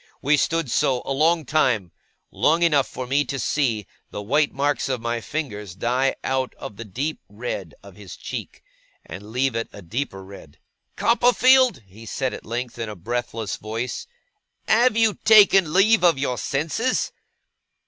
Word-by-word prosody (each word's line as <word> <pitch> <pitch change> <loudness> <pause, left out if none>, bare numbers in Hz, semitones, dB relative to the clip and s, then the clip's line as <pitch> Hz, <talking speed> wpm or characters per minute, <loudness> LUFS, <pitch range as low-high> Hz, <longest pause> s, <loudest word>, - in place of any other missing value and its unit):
We 145 +2 +3
stood 165 -2 0
so, 125 -2 +1
a - - -1
long 160 +3 +2
time; 120 - +1 0.4
long 165 +3 +2
enough 150 -6 +3
for 130 - -6
me 140 +3 +1
to 135 +2 -4
see 120 -6 0 0.2
the 105 - -6
white 145 +7 +2
marks 145 0 -1
of 130 -2 -1
my 120 0 -2
fingers 105 - -5
die 125 +6 0
out 130 -1 -1
of 100 - -9
the 115 - -6
deep 135 +10 -3
red 105 -6 -6
of 100 -1 -14
his 100 -3 -10
cheek, - - -7 0.4
and 105 +3 -10
leave 130 +1 0
it 115 - -2
a 100 - -11
deeper 95 0 -4
red. 95 -6 -13 0.4
'Copperfield,' 245 - +4
he 105 +4 -14
said 130 +4 -2
at - - -9
length, 120 +1 -4
in 115 -1 -3
a 105 - -7
breathless 115 +1 -4
voice, 115 - -5 0.6
'have 230 +1 +4
you 225 -2 +4
taken 200 -6 +6
leave 200 +4 +4
of 170 -5 +5
your 130 -2 -2
senses? 160 - -1
130 Hz, 165 wpm, -23 LUFS, 110-155 Hz, 0.6 s, taken